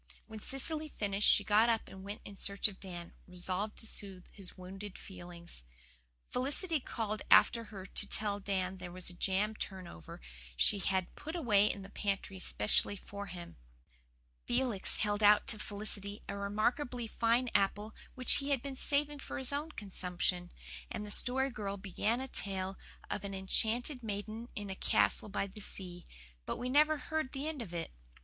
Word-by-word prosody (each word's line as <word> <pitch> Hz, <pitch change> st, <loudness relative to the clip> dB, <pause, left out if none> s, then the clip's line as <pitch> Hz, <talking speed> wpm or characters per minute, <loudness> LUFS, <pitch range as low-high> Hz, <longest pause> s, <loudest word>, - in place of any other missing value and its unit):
When 220 Hz, -1 st, -8 dB
Cecily 305 Hz, +6 st, 0 dB
finished 205 Hz, -4 st, +2 dB
she 205 Hz, -, +6 dB
got 215 Hz, +3 st, +5 dB
up 225 Hz, -1 st, +1 dB
and 190 Hz, 0 st, -10 dB
went 205 Hz, +2 st, -6 dB
in 200 Hz, -, -8 dB
search 200 Hz, +1 st, +4 dB
of 200 Hz, -3 st, -9 dB
Dan, 175 Hz, -3 st, -7 dB
resolved 185 Hz, +3 st, -3 dB
to -, -, +1 dB
soothe 195 Hz, -4 st, 0 dB
his 195 Hz, -2 st, -11 dB
wounded 190 Hz, +2 st, -8 dB
feelings. 175 Hz, -, -9 dB, 0.7 s
Felicity 295 Hz, +6 st, +1 dB
called 215 Hz, -4 st, -3 dB
after 230 Hz, +2 st, +7 dB
her 195 Hz, -3 st, -8 dB
to 205 Hz, +2 st, -2 dB
tell 205 Hz, -1 st, +1 dB
Dan 190 Hz, -1 st, -1 dB
there 180 Hz, -1 st, -7 dB
was 185 Hz, 0 st, -2 dB
a -, -, -11 dB
jam 195 Hz, +4 st, +1 dB
turnover 185 Hz, -, -6 dB, 0.4 s
she 200 Hz, -, +5 dB
had 190 Hz, -2 st, 0 dB
put 315 Hz, +3 st, -6 dB
away 210 Hz, -, +4 dB
in 200 Hz, -, -7 dB
the 195 Hz, -, -10 dB
pantry 195 Hz, -2 st, -2 dB
specially 105 Hz, -, +2 dB
for 200 Hz, +1 st, -7 dB
him. 175 Hz, -1 st, -8 dB, 0.9 s
Felix 240 Hz, -5 st, +1 dB
held 205 Hz, 0 st, +1 dB
out 210 Hz, 0 st, +7 dB
to 215 Hz, -, +1 dB
Felicity 205 Hz, 0 st, -3 dB
a -, -, -3 dB
remarkably 235 Hz, +5 st, 0 dB
fine 230 Hz, +2 st, +2 dB
apple 205 Hz, +2 st, +2 dB, 0.2 s
which 255 Hz, -1 st, +6 dB
he 280 Hz, 0 st, -3 dB
had 275 Hz, -4 st, +1 dB
been 275 Hz, -1 st, -4 dB
saving 290 Hz, +2 st, 0 dB
for -, -, -5 dB
his 265 Hz, +1 st, 0 dB
own 295 Hz, +3 st, -1 dB
consumption; 180 Hz, -4 st, -2 dB, 0.4 s
and 210 Hz, -, -4 dB
the 205 Hz, -, -7 dB
Story 265 Hz, +4 st, +3 dB
Girl 200 Hz, -4 st, -3 dB
began 205 Hz, +4 st, 0 dB
a 265 Hz, -, -3 dB
tale 195 Hz, -5 st, -1 dB, 0.4 s
of 205 Hz, -, -2 dB
an 195 Hz, -1 st, -4 dB
enchanted 230 Hz, +7 st, +1 dB
maiden 215 Hz, +2 st, -4 dB
in 205 Hz, -2 st, -4 dB
a -, -, -4 dB
castle 105 Hz, -, +2 dB
by 200 Hz, -, 0 dB
the 200 Hz, +2 st, -9 dB
sea; 180 Hz, -3 st, -6 dB, 0.4 s
but -, -, -2 dB
we 245 Hz, +1 st, -3 dB
never 300 Hz, +3 st, +5 dB
heard 315 Hz, -3 st, -2 dB
the 275 Hz, +2 st, -2 dB
end 310 Hz, -4 st, -3 dB
of 205 Hz, -7 st, -6 dB
it. 170 Hz, -1 st, -4 dB
205 Hz, 175 wpm, -34 LUFS, 190-240 Hz, 0.9 s, after